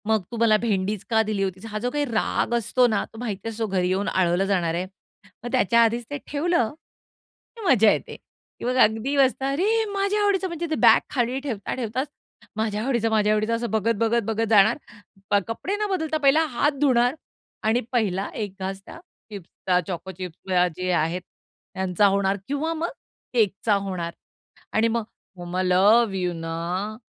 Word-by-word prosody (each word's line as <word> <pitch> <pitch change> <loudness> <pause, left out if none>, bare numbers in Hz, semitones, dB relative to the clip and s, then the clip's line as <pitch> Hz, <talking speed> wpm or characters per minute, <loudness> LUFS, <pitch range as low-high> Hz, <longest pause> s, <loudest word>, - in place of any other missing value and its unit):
"मग 220 -3 +2
तू 235 - -5
मला 225 -2 +4
भेंडीच 210 -2 -1
का 225 -1 +4
दिली 210 -2 -1
होतीस?" 190 +2 -4
हा 215 - -3
जो 245 +3 -1
काही 290 +1 0
राग 235 -1 -1
असतो 235 +2 +2
ना, 215 -3 0
तो - - -16
माहिती 225 -3 -4
असतो 225 0 -3
घरी 185 -2 0
येऊन 195 +2 0
आळवलं 180 +1 +2
जाणार 180 -4 0
आहे. 180 +2 -2 0.6
मग 240 - -5
त्याच्या 235 -3 +3
आधीच 235 +1 0
ते 290 - -3
ठेवलं, 295 -6 0 0.8
की 460 - -10
मजा 225 - +5
येते - - -3 0.4
किंवा 250 - -1
मग 255 - 0
अगदी 225 +6 +3
बसतात 270 0 +2
अरे! 430 +10 +1
माझ्या 400 +1 0
आवडीचं 395 -2 +2
म्हणजे 340 -1 -4
ते 315 - 0
बॅग 225 -1 +8 0.2
खाली 250 +1 0
ठेवता-ठेवताच 250 +1 -3 0.5
माझ्या 215 -1 -1
आवडीचं, 235 -4 +1
माझ्या 215 -1 +3
आवडीचं 215 +2 +1
असं 235 0 -3
बघत-बघत-बघत 225 +1 +1
जाणार 220 +1 +5 0.7
कपडे 290 - -3
न 420 - +1
बदलता 320 -5 -1
पहिला 300 +2 +4
हात 290 +5 +3
धुणार 250 -2 +3 0.5
आणि 225 +3 +2
पहिला 200 -6 0
एक 205 -3 -4
घास 190 +1 -4
त्या - - -11 0.3
चिप्सचा, 185 -2 -2
चोको 185 +1 -5
चिप्स 185 0 -8 0.3
जे 185 0 -1
आहेत 170 +1 0 0.5
त्यांचा 190 +1 +1
होणार 195 0 +1
किंवा 290 +4 -1
मग 330 +1 -2 0.4
केकचा 215 -2 +2
होणार 185 -4 -3 0.6
आणि 225 +1 +3
मग 230 0 -1 0.3
"मम्मा 175 +1 -3
लव्ह 200 +4 +4
यू 180 -1 -1
ना, 170 +5 -4
220 Hz, 170 wpm, -24 LUFS, 195-250 Hz, 0.8 s, बॅग